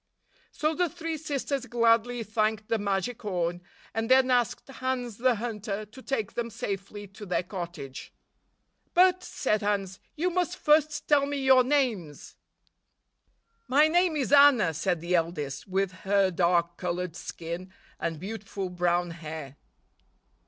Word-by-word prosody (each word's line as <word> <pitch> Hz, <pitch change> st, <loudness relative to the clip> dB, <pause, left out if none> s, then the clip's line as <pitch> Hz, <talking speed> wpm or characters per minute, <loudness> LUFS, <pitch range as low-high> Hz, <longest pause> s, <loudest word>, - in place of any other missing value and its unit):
So 305 Hz, +1 st, 0 dB
the 355 Hz, +1 st, +1 dB
three 330 Hz, 0 st, -4 dB
sisters 280 Hz, -3 st, -3 dB
gladly 235 Hz, 0 st, +2 dB
thanked 215 Hz, 0 st, -1 dB
the 225 Hz, -, +1 dB
magic 205 Hz, +4 st, -2 dB
horn, 175 Hz, -4 st, -2 dB, 0.3 s
and 225 Hz, +1 st, -2 dB
then 260 Hz, 0 st, +5 dB
asked 245 Hz, -2 st, +1 dB
Hans 255 Hz, -4 st, -3 dB
the 250 Hz, 0 st, +3 dB
Hunter 215 Hz, -2 st, -4 dB
to 220 Hz, +5 st, -14 dB
take 240 Hz, -7 st, -2 dB
them 235 Hz, -1 st, -2 dB
safely 200 Hz, 0 st, -5 dB
to 200 Hz, +2 st, -12 dB
their 180 Hz, -2 st, -1 dB
cottage. 175 Hz, -7 st, -7 dB, 0.8 s
"But," 365 Hz, +1 st, +5 dB
said 215 Hz, -10 st, -1 dB
Hans, 200 Hz, -2 st, -1 dB, 0.2 s
"you 355 Hz, +4 st, 0 dB
must 360 Hz, 0 st, -1 dB
first 300 Hz, -2 st, +2 dB
tell 285 Hz, -2 st, +4 dB
me 285 Hz, 0 st, -2 dB
your 260 Hz, -1 st, +7 dB
names." 245 Hz, -, -1 dB, 1.3 s
"My 295 Hz, +4 st, +5 dB
name 350 Hz, 0 st, +2 dB
is 280 Hz, -3 st, -1 dB
Anna," 280 Hz, -, +6 dB
said 175 Hz, +1 st, -1 dB
the 170 Hz, +1 st, -2 dB
eldest, 160 Hz, -4 st, -1 dB
with 190 Hz, 0 st, 0 dB
her 190 Hz, +2 st, +1 dB
dark 170 Hz, 0 st, +1 dB
colored 180 Hz, -2 st, -3 dB
skin 170 Hz, +2 st, -6 dB, 0.3 s
and 165 Hz, -2 st, -3 dB
beautiful 195 Hz, 0 st, -5 dB
brown 175 Hz, 0 st, +1 dB
hair. 155 Hz, -4 st, -7 dB
215 Hz, 140 wpm, -28 LUFS, 180-265 Hz, 1.3 s, your